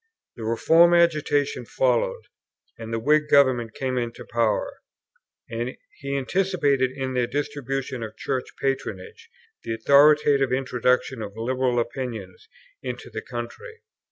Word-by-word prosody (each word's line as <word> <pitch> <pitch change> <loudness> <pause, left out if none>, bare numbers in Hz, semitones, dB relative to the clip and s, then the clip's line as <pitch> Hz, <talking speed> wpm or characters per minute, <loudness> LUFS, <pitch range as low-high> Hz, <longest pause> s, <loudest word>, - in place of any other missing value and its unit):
The 115 - -8
Reform 165 +10 +4
agitation 150 -5 +2
followed, 125 0 0 0.5
and 115 0 -8
the 115 - -1
Whig 150 +5 +2
Government 125 -5 +3
came 130 -1 -1
into 120 -1 -5
power; 115 -3 -1 0.7
and 120 +2 -4 0.2
he 140 0 -3
anticipated 140 -3 +1
in 130 -1 -3
their 125 -1 +1
distribution 135 -2 -3
of 110 -1 -7
Church 130 -2 -2
patronage 115 -9 -4 0.3
the 115 -1 -3
authoritative 140 +2 +5
introduction 125 -1 0
of 105 0 -7
liberal 125 +1 0
opinions 120 -5 -5 0.3
into - - -6
the - - -5
country. 460 -1 -8
130 Hz, 125 wpm, -24 LUFS, 115-140 Hz, 0.7 s, authoritative